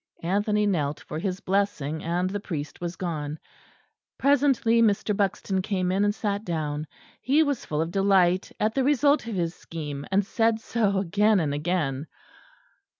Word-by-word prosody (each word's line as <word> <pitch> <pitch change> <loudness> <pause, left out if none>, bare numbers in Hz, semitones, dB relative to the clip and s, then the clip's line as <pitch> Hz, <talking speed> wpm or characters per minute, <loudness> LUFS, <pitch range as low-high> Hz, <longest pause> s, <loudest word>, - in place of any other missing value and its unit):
Anthony 205 +4 +1
knelt 150 -8 0
for 155 - -6
his 185 +1 -3
blessing, 180 -6 -1
and 175 +2 0
the 200 +2 -3
priest 155 -7 -6
was 175 0 -3
gone. 155 -4 -4 0.8
Presently 270 -5 +3
Mr. 210 -1 +2
Buxton 195 -1 0
came 185 -2 -1
in 195 +2 +2
and 205 0 +1
sat 205 -1 -2
down. 155 -4 -3 0.3
He 290 +5 +4
was 285 -4 -2
full 150 0 -1
of 165 - -6
delight 190 -1 +3
at 215 +1 +1
the 270 - +1
result 285 -1 +3
of 225 - -3
his 170 -2 -1
scheme; 150 -5 -7
and 195 +1 +2
said 225 +1 +1
so 220 -3 0
again 205 +3 +3
and 150 -4 0
again. 150 -2 -1
195 Hz, 160 wpm, -26 LUFS, 165-215 Hz, 0.8 s, He